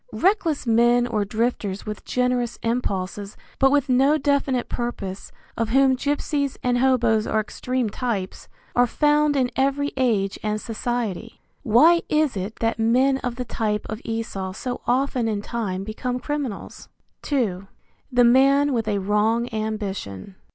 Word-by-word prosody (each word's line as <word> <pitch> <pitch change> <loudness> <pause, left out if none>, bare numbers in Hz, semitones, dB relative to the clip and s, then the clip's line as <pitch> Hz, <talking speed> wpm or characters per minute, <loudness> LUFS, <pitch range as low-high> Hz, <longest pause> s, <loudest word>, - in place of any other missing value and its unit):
Reckless 365 -7 +1
men 240 +1 +4
or 220 -4 -1
drifters 215 -2 -2
with 210 -1 -6
generous 250 -1 0
impulses 205 -4 -2 0.2
but 270 - +5
with 285 0 +2
no 270 +4 +4
definite 280 -3 0
purpose, 200 -5 -5 0.2
of 230 -1 -1
whom 265 +2 +4
gypsies 285 0 -1
and 245 -1 +1
hoboes 240 -4 +2
are 220 - +1
extreme 250 +3 -2
types, 210 -4 -4 0.3
are 245 0 +4
found 295 +3 +2
in 255 -2 +1
every 275 +2 +1
age 215 -7 +1
and 215 0 -1
society. 230 -2 -4 0.2
Why 300 +8 +5
is 305 -4 +2
it 195 +3 -4
that 225 0 0
men 255 +4 +3
of 245 -2 -4
the 250 0 -4
type 210 -2 -2
of 220 +2 -5
Esau 210 -4 -4
so 245 +5 -5
often 255 -1 +1
in 210 -2 -2
time 200 -6 -3
become 245 +4 -3
criminals? 285 -7 -5 0.4
II. 200 -9 0 0.4
THE 245 -1 +4
MAN 275 +4 +4
WITH 225 -3 -1
A 205 -1 +1
WRONG 210 +4 +1
AMBITION. 205 - -4
240 Hz, 145 wpm, -23 LUFS, 215-265 Hz, 0.4 s, but